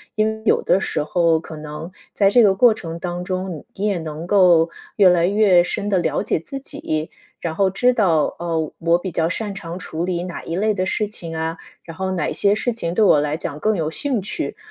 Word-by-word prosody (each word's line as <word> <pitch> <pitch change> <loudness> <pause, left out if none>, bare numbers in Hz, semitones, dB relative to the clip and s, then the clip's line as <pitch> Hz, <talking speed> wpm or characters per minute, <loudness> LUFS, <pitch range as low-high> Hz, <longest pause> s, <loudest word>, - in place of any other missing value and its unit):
因 215 0 +2
为 220 0 -4
有 - - +3
的 190 - +2
时 - - -1
候 165 +1 +2
可 160 0 -10
能 150 +2 -8 0.2
在 200 -1 +4
这 235 +4 +5
个 195 -2 +4
过 230 +2 +5
程 165 -5 -7
当 175 0 -4
中， 185 -3 -4
你 200 - -3
也 200 -4 0
能 160 +1 -6
够 180 -4 +5 0.3
越 200 - +7
来 175 -1 +4
越 195 -3 +4
深 200 +3 -3
地 200 - +2
了 170 - 0
解 - - 0
自 275 +11 -7
己。 265 - -4 0.3
然 165 -2 -3
后 195 +3 +2
知 245 +7 +2
道， 175 -10 +2
哦， 165 -3 -2
我 170 +1 +3
比 180 0 -5
较 160 +1 0
擅 205 +3 -3
长 170 -3 -7
处 165 -2 -5
理 175 -1 -2
哪 180 -1 -6
一 165 - -4
类 215 +3 +1
的 185 -1 -1
事 210 +1 0
情 170 -5 -7
啊， 160 +1 -3 0.3
然 165 - -10
后 190 +2 -3
哪 170 -5 -1
些 200 0 +2
事 235 +2 -1
情 170 -6 -4
对 215 - +4
我 150 -6 +5
来 150 +1 -1
讲 150 -3 -5
更 215 +7 +1
有 160 -2 -1
兴 265 - -1
趣。 210 - -4
180 Hz, 250 characters per minute, -21 LUFS, 165-205 Hz, 0.3 s, 越